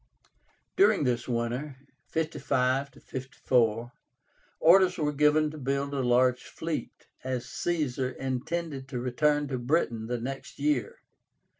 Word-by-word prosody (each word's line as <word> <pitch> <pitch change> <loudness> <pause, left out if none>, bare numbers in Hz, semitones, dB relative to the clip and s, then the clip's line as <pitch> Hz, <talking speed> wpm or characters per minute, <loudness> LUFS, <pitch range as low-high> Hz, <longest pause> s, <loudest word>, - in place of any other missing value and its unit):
During 385 - +5
this 125 -3 0
winter 125 +4 -2 0.3
(55 140 -4 0 0.2
54), 120 -3 0 0.7
orders 180 +2 +6
were 150 -3 0
given 150 +1 +3
to 155 - -9
build 140 +1 -1
a 140 - -1
large 125 0 +3
fleet, 160 -1 -5 0.2
as 130 -2 -2
Caesar 140 -7 -1
intended 135 +3 -3
to 125 -2 -4
return 145 +4 +1
to 130 -2 -2
Britain 120 -4 0
the 120 0 -2
next 135 +3 -6
year. 140 -6 -1
135 Hz, 120 wpm, -28 LUFS, 125-150 Hz, 0.7 s, orders